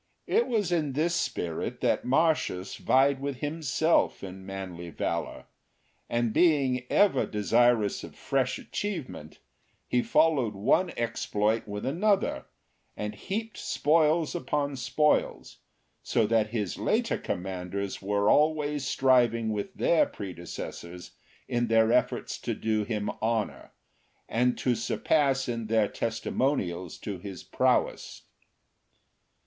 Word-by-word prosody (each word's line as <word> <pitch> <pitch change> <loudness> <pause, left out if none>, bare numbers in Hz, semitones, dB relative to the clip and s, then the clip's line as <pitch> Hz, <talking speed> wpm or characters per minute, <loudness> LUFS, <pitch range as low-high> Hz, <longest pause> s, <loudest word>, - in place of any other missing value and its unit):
It 460 - +2
was 210 -7 0
in 155 -5 0
this 160 +5 +1
spirit 85 - -2
that - - +1
Marcius 135 - +1
vied 135 +1 +3
with 140 -1 -3
himself 155 0 +1
in 95 0 -8
manly 90 -3 -6
valour, - - -3 0.6
and 120 -2 0
being 135 -7 +2
ever 205 -2 +3
desirous 110 0 +2
of - - -10
fresh - - -1
achievement, 160 - -5 0.5
he 125 - +2
followed 145 -8 +2
one 170 - +2
exploit 110 -1 0
with 105 0 -5
another, 195 +8 +1 0.5
and 105 0 -3
heaped 210 - -5
spoils 155 +1 +2
upon 140 +1 -2
spoils, 135 +4 0 0.4
so 115 - +1
that 110 0 +2
his 105 -6 -3
later - - 0
commanders 95 +1 -4
were 100 +1 0
always 150 -1 +2
striving 120 -5 +3
with 105 -1 -3
their 170 - +3
predecessors 90 -1 -8 0.4
in 120 0 0
their 115 0 +4
efforts - - 0
to - - -3
do 110 -1 0
him 105 -1 -2
honour, 110 -1 -2 0.6
and 125 +2 +1
to 125 - +1
surpass 135 +2 +1
in 115 -2 -3
their 110 -1 +3
testimonials 110 - -2
to 100 -4 -6
his 95 -1 -8
prowess. - - 0
120 Hz, 120 wpm, -28 LUFS, 105-150 Hz, 0.6 s, their